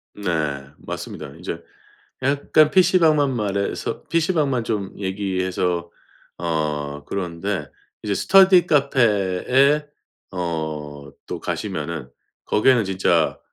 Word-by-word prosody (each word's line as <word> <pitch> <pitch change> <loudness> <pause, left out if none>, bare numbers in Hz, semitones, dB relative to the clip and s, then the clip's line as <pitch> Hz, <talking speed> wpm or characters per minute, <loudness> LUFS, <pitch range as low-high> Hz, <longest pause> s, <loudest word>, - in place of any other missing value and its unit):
네. 75 -8 -2
맞습니다. - - -7
이제 - - -6 0.6
약간 145 +2 +3
PC방만 160 -6 +4
말해서 100 -3 -2
PC방만 155 -7 +1
좀 105 -4 -3
얘기해서 95 -3 -1 0.5
어 75 -3 -2
그런데 90 -3 -3 0.3
이제 105 - -1
스터디 190 - +6
카페에 130 +1 +3 0.5
어 80 -4 -3 0.5
또 - - -5
가시면은 80 -7 -4 0.4
거기에는 120 0 +3
진짜 95 0 +1
100 Hz, 215 characters per minute, -22 LUFS, 85-140 Hz, 0.6 s, 스터디